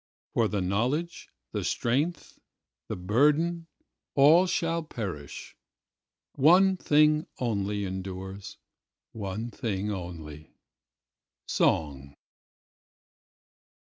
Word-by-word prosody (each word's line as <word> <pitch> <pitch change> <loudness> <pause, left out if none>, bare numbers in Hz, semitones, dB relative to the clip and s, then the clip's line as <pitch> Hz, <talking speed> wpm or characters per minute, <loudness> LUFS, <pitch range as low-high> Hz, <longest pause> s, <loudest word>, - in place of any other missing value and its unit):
For 115 -2 +2
the 105 -2 -2
knowledge, 125 - -1 0.2
the - - -3
strength, 145 +7 -1 0.5
the - - -3
burden—all 150 - +2
shall 165 -2 0
perish:One 150 - -1
thing 150 -2 +3
only 105 -4 -1
endures, 95 +1 -6 0.5
one 110 +3 -5
thing 105 -5 -3
only—song. 75 -4 -5
110 Hz, 65 wpm, -28 LUFS, 95-155 Hz, 0.5 s, thing